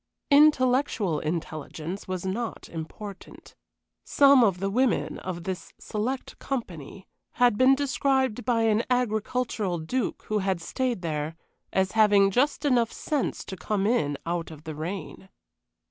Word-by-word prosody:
Intellectual 255 - +4
intelligence 160 +3 -5
was 185 -1 -4
not 220 +5 -4
important. 190 +5 -9 0.5
Some 280 -3 +6
of 195 -5 +2
the 195 +1 -1
women 255 +1 +1
of 175 -2 -5
this 185 0 -5
select 245 +5 -4
company 190 - -6 0.3
had 245 -3 +4
been 255 +4 +5
described 265 -3 0
by 235 -2 +1
an 220 0 +3
agricultural 225 -5 0
duke 225 +11 -3
who 215 0 0
had 190 -2 0
stayed 240 +3 -2
there 155 -1 -3 0.4
as 190 0 +1
having 205 -3 +5
just 285 +7 +1
enough 240 -5 +3
sense 295 -4 -2
to 190 - -6
come 195 +3 -1
in 150 -11 +1
out 170 0 -2
of 155 -2 -12
the 160 -1 -6
rain. 185 +4 -6
210 Hz, 135 wpm, -26 LUFS, 175-250 Hz, 0.5 s, Some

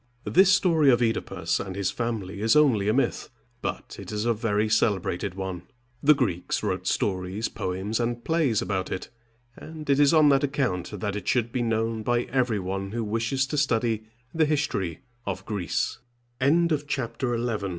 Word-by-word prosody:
This 190 +1 +5
story 170 -7 +4
of 120 -2 +5
OEdipus 115 -2 -1
and 95 -1 -7
his 100 -2 -1
family 105 -5 -3
is 110 +5 +3
only 125 -10 +4
a - - +3
myth, - - 0 0.3
but - - -5
it - - -8
is 105 +1 -2
a 120 - +3
very 110 -1 0
celebrated 100 -3 0
one. 95 -2 -4 0.4
The 150 +1 +6
Greeks 90 - -1
wrote - - -2
stories, 95 +3 -1
poems, 95 +5 -3
and 120 0 -2
plays 145 -9 +2
about 95 -4 -2
it, 95 - -4 0.5
and 155 -1 -9
it 140 0 +3
is 145 -1 +6
on 155 -2 +6
that 140 -1 +4
account 105 -9 -1
that 105 -1 -2
it 105 -3 -6
should 120 -2 +1
be 125 - -1
known 115 -1 0
by 120 +2 +1
every 125 -4 +1
one 95 +1 -4
who 115 -1 -1
wishes 115 +5 0
to 150 +3 -4
study 115 -5 +1 0.3
th 150 - 0
115 Hz, 155 wpm, -26 LUFS, 100-135 Hz, 0.5 s, The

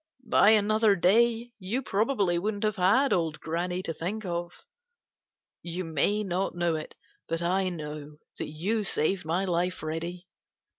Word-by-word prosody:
By 210 - +5
another 215 0 +4
day 230 +6 +3
you 215 +8 -2
probably 200 -5 +1
wouldn't 205 +2 -2
have 215 -1 0
had 225 +10 +4
old 165 -3 0
Granny 175 +3 -2
to 165 - -3
think 195 +7 -4
of. 175 -1 -5 1.0
You 175 +2 -4
may 200 +6 +1
not 185 -1 -2
know 175 -1 +1
it, 155 - -6 0.3
but 165 +1 -2
I 185 +2 +1
know 150 -3 -7 0.2
that - - -3
you 195 +9 -1
saved 185 -1 0
my 175 +5 0
life, 180 0 -1
Reddy. 170 +3 -4
180 Hz, 150 wpm, -28 LUFS, 170-210 Hz, 1.0 s, By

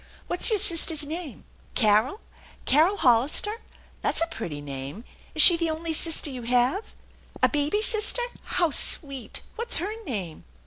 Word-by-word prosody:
What' 355 - -5
s - - +6
your 435 - +1
sister's 330 -4 +3
name? 315 -1 -4 0.3
Carol? 220 - +1 0.4
Carol 330 +8 +2
Hollister? 270 - 0 0.4
That's - - -1
a 330 - +1
pretty 165 - -7
name! 140 - -8 0.3
Is 310 - +7
she 345 - +8
the 335 -1 -1
only 320 +1 -4
sister 315 -2 -1
you 255 -2 -8
have? 250 - -1 0.5
A - - +5
baby 300 +8 -1
sister? 440 +2 +3 0.2
How 345 -3 -1
sweet! 275 -6 +2
What's 470 +2 +2
her 375 +6 -4
name? 195 - -6
305 Hz, 150 wpm, -24 LUFS, 240-355 Hz, 0.5 s, she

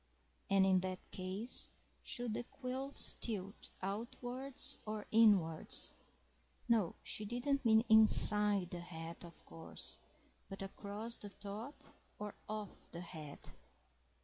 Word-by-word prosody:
And 195 -1 +5
in 190 -1 +5
that 185 0 -5
case, 190 +6 -1 0.3
should 240 -3 -2
the 240 +2 -3
quills 265 +2 +3
tilt 200 -4 -3
outwards 245 +6 -2
or 215 -1 -4
inwards? 200 -8 +4 0.7
No, 220 -7 +3
she 215 - -3
didn't 245 +6 0
mean 220 -1 +5
inside 210 -3 +5
the 175 - -4
hat, 165 -1 -7
of 170 -1 -12
course, 165 - -5 0.5
but 195 -1 -5
across 205 +4 -2
the 205 - -6
top 205 +7 -7 0.4
or 210 -1 -5 0.2
off 215 -2 -6
the 170 - -6
head?... 155 -5 -8
210 Hz, 120 wpm, -37 LUFS, 185-230 Hz, 0.7 s, And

